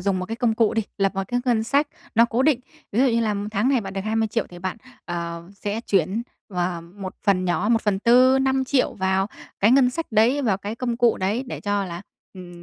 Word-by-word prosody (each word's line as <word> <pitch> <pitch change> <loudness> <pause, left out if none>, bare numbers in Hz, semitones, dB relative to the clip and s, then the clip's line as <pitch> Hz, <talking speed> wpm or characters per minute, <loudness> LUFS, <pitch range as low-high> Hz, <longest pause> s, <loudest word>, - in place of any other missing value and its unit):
dùng 190 0 0
một 185 - -4
cái 225 +3 -4
công 235 -2 +1
cụ 225 0 +2
đi, 225 - +1 0.2
lập 195 0 +1
một 195 - -1
cái 245 0 0
ngân 235 -4 +2
sách 285 +6 +2 0.3
nó 230 +1 +6
cố 235 +2 0
định. 275 -3 +3 0.3
Ví 220 - +2
dụ 270 - +5
như 235 -2 +2
là 215 -2 0 0.2
tháng 215 +4 +1
này 270 -3 +3
bạn 195 -2 -7
được 195 - -3
20.000.000 220 +1 0
thì 175 - -11
bạn, 185 +2 -4 0.3
ờ, 170 -1 -4
sẽ 205 +2 -3
chuyển 195 +1 0 0.3
và 180 -2 -2
một 185 +3 -9
phần 190 -3 +2
nhỏ, 180 +3 0
1/4, 235 +5 +4
5.000.000 265 0 +1
vào 190 0 +1 0.3
cái 205 - +5
ngân 255 -1 +5
sách 330 +6 -4
đấy, 240 +7 +3
vào 215 -7 +2
cái 205 +3 -5
công 240 -1 -2
cụ 235 -1 +3
đấy, 205 +7 -1
để - - -6
cho 205 -1 -1
là, 175 0 -7 0.3
ừm, 175 -2 -11
215 Hz, 230 wpm, -23 LUFS, 190-240 Hz, 0.3 s, nó